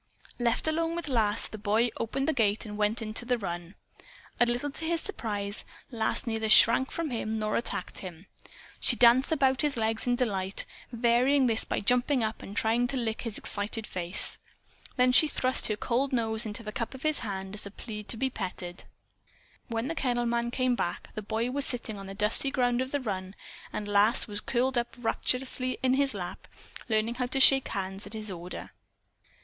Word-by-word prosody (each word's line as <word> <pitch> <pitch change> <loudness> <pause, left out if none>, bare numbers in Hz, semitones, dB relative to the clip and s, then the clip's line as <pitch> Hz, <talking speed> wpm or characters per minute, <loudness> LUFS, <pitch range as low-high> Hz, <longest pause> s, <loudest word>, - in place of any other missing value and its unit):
Left 240 +4 +1
alone 330 +1 0
with 340 -3 -3
Lass, 220 -5 +2
the 215 - -9
boy 215 +4 +2
opened 270 +4 -2
the 315 - +2
gate 220 -4 +1
and 210 -1 -6
went 210 +2 0
into 215 +2 -3
the 245 0 +1
run. 175 -3 -5 0.6
A 240 - +5
little 245 +4 -1
to 320 - -7
his 335 0 +1
surprise 210 - -3 0.3
Lass 225 +3 -1
neither 225 -2 -1
shrank 235 +4 +6
from 330 -4 -3
him 220 -2 -2
nor 215 -1 -1
attacked 235 - -2
him. 180 -1 -9 0.5
She 245 - +3
danced 245 +4 +5
about 270 -4 +3
his 295 -4 0
legs 225 +1 0
in 245 - +3
delight, 195 -6 -1 0.3
varying 245 +4 +3
this 225 -2 +4
by - - -1
jumping 245 +4 +2
up 220 0 -3
and 200 - -9
trying 230 +2 +2
to 270 +1 -3
lick 225 -3 -2
his 230 -4 -4
excited 210 +2 -3
face. 180 0 -1 0.6
Then 250 0 +4
she 280 +5 +6
thrust 260 -3 +1
her 215 - 0
cold 255 +5 0
nose 225 -2 +1
into 215 +2 -5
the 215 - -5
cup 230 +4 -4
of 265 - -10
his 310 -1 +2
hand 195 -3 -5
as 210 -1 -3
a - - -7
plea 210 +1 -7
to 225 - -2
be 265 +3 0
petted. 180 -4 -6 0.8
When 230 +1 -2
the 325 - -2
kennel 245 -5 0
man 235 0 0
came 255 +1 +1
back, 175 -7 -3
the 215 - -4
boy 225 +4 -2
was 280 +1 +1
sitting 230 -4 +1
on 195 - -8
the 195 - -7
dusty 215 +6 +2
ground 245 -2 +1
of 260 - -2
the 285 0 -1
run, 190 -4 -4 0.4
and 210 - -4
Lass 205 +3 +4
was 210 -2 -5
curled 255 0 +1
up 240 - -5
rapturously 255 +2 0
in 255 0 +4
his 275 -3 +2
lap, 180 -3 -6 0.4
learning 220 +1 +1
how 250 - +1
to 265 +2 -1
shake 270 0 +7
hands 195 0 -4
at 205 - -4
his 215 -2 -2
order. 175 0 -7
230 Hz, 200 wpm, -29 LUFS, 210-255 Hz, 0.8 s, shake